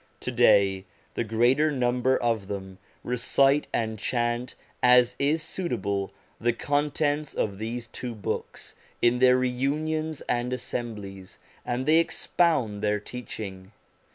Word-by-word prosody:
To - - -3
day 95 -1 +4 0.3
the - - -1
greater 120 +7 +3
number 125 -1 +1
of 115 -5 -1
them 95 -2 -6 0.2
recite 135 +4 +2
and 110 -2 -2
chant, 120 +2 -1 0.3
as 125 0 +5
is 150 +3 +1
suitable, 100 - -2 0.3
the 120 +1 +1
contents 145 +2 -1
of 100 -2 -2
these 115 +2 -4
two 120 +1 -6
Books 105 - -5 0.3
in 120 +1 +4
their 125 0 +6
reunions 150 +5 -1
and 120 +1 -1
assemblies, 105 -6 -6 0.3
and 125 +2 -2
they 155 +3 +5
expound 155 -11 +1
their 105 0 +1
teaching. 105 -4 -8
120 Hz, 125 wpm, -26 LUFS, 110-135 Hz, 0.3 s, their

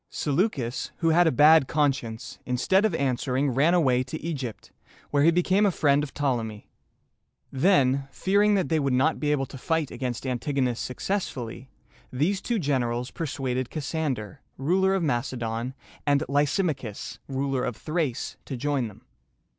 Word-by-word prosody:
Seleucus, 140 - -1
who 165 - +1
had 170 +1 +5
a - - +4
bad 150 +1 +6
conscience, 135 -7 -1
instead 190 - +2
of 200 -6 +1
answering, 135 0 0
ran 150 +8 +3
away 130 -7 +3
to 130 +5 -5
Egypt, 135 -9 -5 0.4
where 145 - +3
he 155 - +6
became 180 +4 +3
a 205 - +5
friend 145 -5 +2
of 150 -2 -4
Ptolemy. 115 -7 -2 0.8
Then, 135 -3 +3
fearing 205 +2 +2
that 190 -3 0
they 160 -1 +2
would 140 -3 0
not 145 +5 +2
be 150 -1 0
able 140 -2 +1
to 135 - -10
fight 160 0 -1
against 125 -1 -4
Antigonus 130 -1 -1
successfully, 130 - -4 0.4
these 170 +10 0
two 235 +2 -1
generals 125 - -1
persuaded 130 -5 -3
Cassander, 140 - -3 0.2
ruler 190 +7 +2
of 190 - 0
Macedon, 120 -2 -2 0.3
and 145 +1 +2
Ly 145 +1 +3
sim´a 165 +1 0
chus, 110 -6 -8
ruler 135 -1 -1
of 125 - -2
Thrace, 155 -6 -2
to 135 - -5
join 140 -2 0
them. 105 - -14
140 Hz, 155 wpm, -26 LUFS, 125-160 Hz, 0.8 s, bad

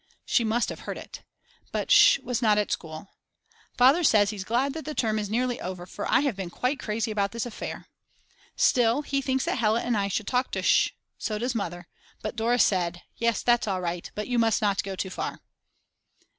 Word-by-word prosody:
She 240 - +2
must 225 +2 0
have - - -6
heard - - -3
it. - - -10 0.5
But - - -2
Sch. - - +8
was 250 -1 -2
not 215 -3 +4
at 210 - 0
school. 160 +3 -5 0.7
Father 270 +8 +5
says 210 -7 +4
he's 205 -3 -5
glad 250 +7 0
that 320 - -6
the 305 +2 -6
term 220 -2 0
is 205 -1 -4
nearly 245 +2 -1
over, 180 -1 -5
for - - -5
I - - +5
have 280 -7 0
been 190 -2 -5
quite 250 +9 -2
crazy 220 0 -2
about 200 -1 -1
this 230 0 -3
affair. 240 - -6 0.7
Still, 245 +3 +3
he 275 -1 -1
thinks 265 -1 0
that - - -1
Hella 225 +1 +2
and 240 -1 0
I 200 -1 0
should 200 +2 -2
talk 250 +3 0
to - - -2
Sch. - - +3 0.2
So 215 -2 -2
does 245 +3 -1
Mother. 175 -5 -4 0.4
But 215 - -4
Dora 235 +2 +1
said: 175 -6 +1
Yes 235 -1 0
that's 240 -2 +3
all 190 -2 -1
right 175 -1 -4
but 210 - -4
you 245 -1 +1
must 225 -2 +3
not 200 -2 +1
go 195 0 -5
too 190 0 -4
far. - - -4
220 Hz, 210 wpm, -26 LUFS, 200-245 Hz, 0.7 s, Sch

